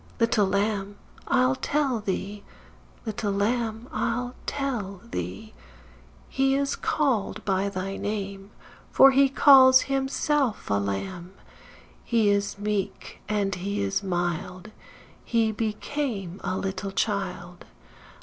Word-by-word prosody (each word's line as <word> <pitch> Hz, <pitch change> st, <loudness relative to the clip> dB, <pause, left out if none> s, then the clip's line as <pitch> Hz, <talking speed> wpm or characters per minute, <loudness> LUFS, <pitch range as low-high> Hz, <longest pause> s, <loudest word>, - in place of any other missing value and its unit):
Little 230 Hz, -3 st, +3 dB
Lamb, 200 Hz, 0 st, -1 dB, 0.3 s
I'll 255 Hz, 0 st, +3 dB
tell 270 Hz, -2 st, 0 dB
thee, 205 Hz, 0 st, -4 dB, 0.6 s
Little 210 Hz, -2 st, -2 dB
Lamb, 225 Hz, +2 st, -1 dB
I'll 245 Hz, -2 st, -2 dB
tell 235 Hz, -9 st, -3 dB
thee, 220 Hz, -1 st, -6 dB, 0.7 s
He 270 Hz, 0 st, +1 dB
is 280 Hz, 0 st, 0 dB
called 275 Hz, -10 st, -1 dB
by 195 Hz, 0 st, +1 dB
thy 195 Hz, 0 st, -4 dB
name, 200 Hz, -1 st, -4 dB, 0.4 s
For 270 Hz, -, +7 dB
he 275 Hz, +1 st, +4 dB
calls 260 Hz, -1 st, +7 dB
himself 270 Hz, -2 st, 0 dB
a 100 Hz, -, +3 dB
Lamb. 175 Hz, -, -4 dB, 0.7 s
He 225 Hz, -3 st, +2 dB
is 200 Hz, 0 st, 0 dB
meek, 205 Hz, -1 st, -3 dB
& -, -, -17 dB
he 200 Hz, -1 st, -1 dB
is 195 Hz, 0 st, 0 dB
mild; 180 Hz, +1 st, -3 dB, 0.5 s
He 225 Hz, -2 st, +1 dB
became 215 Hz, -, -3 dB
a 185 Hz, -1 st, -2 dB
little 195 Hz, 0 st, -3 dB
child. 185 Hz, -4 st, -3 dB
210 Hz, 110 wpm, -26 LUFS, 195-250 Hz, 0.7 s, For